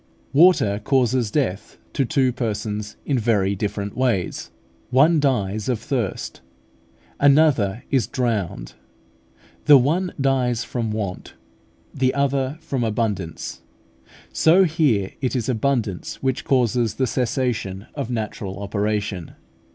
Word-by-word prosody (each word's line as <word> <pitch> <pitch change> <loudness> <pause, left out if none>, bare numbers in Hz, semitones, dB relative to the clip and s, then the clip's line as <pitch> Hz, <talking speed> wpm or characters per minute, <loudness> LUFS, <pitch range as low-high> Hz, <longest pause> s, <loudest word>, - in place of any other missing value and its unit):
Water 140 - +4
causes 125 -3 +2
death 110 -7 -2 0.2
to 135 - +1
two 130 -1 +2
persons 105 -3 -3
in 135 -4 +1
very 105 -4 +1
different 100 0 -3
ways. 115 -10 -1 0.4
One 150 +6 +4
dies 110 -6 0
of 125 - +1
thirst, 115 -4 -3 0.8
another 140 -8 +3
is 130 -4 +2
drowned: 105 - -2 0.9
the 145 -2 +9
one 170 +8 +1
dies 125 -3 +1
from 115 -3 -3
want, 100 -4 -5 0.6
the 130 -1 +1
other 140 0 0
from 135 -6 -2
abundance. 105 -7 -3 0.7
So 175 +4 +5
here 150 - +1
it 130 -1 -1
is 120 -4 -1
abundance 115 -6 -1
which 130 -1 -2
causes 120 -4 +1
the 130 - +1
cessation 120 -6 -2
of - - -4
natural 105 -4 -4
operation. 100 -3 -2
120 Hz, 115 wpm, -22 LUFS, 105-135 Hz, 0.9 s, the